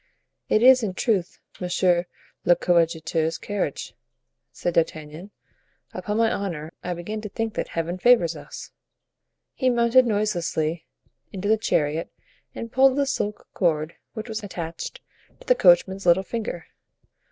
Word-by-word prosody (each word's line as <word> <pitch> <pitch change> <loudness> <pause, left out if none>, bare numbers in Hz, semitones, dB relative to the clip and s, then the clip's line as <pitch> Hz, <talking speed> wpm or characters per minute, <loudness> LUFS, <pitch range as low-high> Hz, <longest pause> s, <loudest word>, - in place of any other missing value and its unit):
"It 215 - +3
is, 255 0 +8
in 200 -5 -3
truth, 195 -7 0 0.2
monsieur 180 -1 +1 0.4
le 175 - +5
coadjuteur's 165 -2 +1
carriage," 200 -8 -4 0.6
said 175 - -3
D'Artagnan; 160 +2 -2 0.6
"upon 210 0 -3
my 225 0 +3
honor 165 -5 -4
I 180 0 -3
begin 210 +6 -5
to 210 - -6
think 225 +1 -3
that - - -3
Heaven 170 +2 -3
favors 185 -8 +4
us." - - -10 0.8
He 260 - +1
mounted 240 +1 +4
noiselessly 175 -7 -1 0.4
into 195 +1 -4
the 220 - +5
chariot 160 -7 -1 0.4
and 230 - -6
pulled 265 +1 +4
the 285 - +2
silk 210 -6 -3
cord 160 -3 0 0.2
which 220 0 -6
was 220 -1 -4
attached 180 - -6 0.4
to - - -16
the - - +5
coachman's 190 - +4
little 175 +2 +5
finger. 210 -4 -5
185 Hz, 140 wpm, -24 LUFS, 170-220 Hz, 0.8 s, is